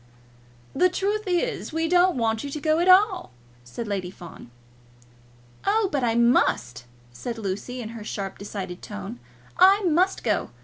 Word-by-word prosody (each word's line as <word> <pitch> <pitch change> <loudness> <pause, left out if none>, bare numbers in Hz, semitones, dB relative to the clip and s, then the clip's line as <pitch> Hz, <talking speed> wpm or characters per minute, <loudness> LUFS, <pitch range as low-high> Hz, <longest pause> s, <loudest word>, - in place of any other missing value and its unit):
"The 365 - +3
truth 410 +4 -1
is, 365 +7 -1
we 325 +1 -1
don't 355 -1 +3
want 225 -2 0
you 285 - -5
to 300 - -5
go 310 +2 +1
at 350 - +1
all," 375 0 +5 0.3
said 165 - -7
Lady 195 -3 -3
Fawn. 175 -8 -12 1.1
"Oh, 415 0 +2
but 280 -3 -1
I 230 -1 +1
must," 235 - +2 0.3
said 235 - -6
Lucy 215 +5 -4
in 220 - -6
her 230 -2 -8
sharp, 195 -2 -5
decided 195 -3 -6
tone. 100 +5 -8 0.4
"I 390 +3 +6
must 360 +2 +2
go. - - 0
255 Hz, 160 wpm, -24 LUFS, -, 1.1 s, I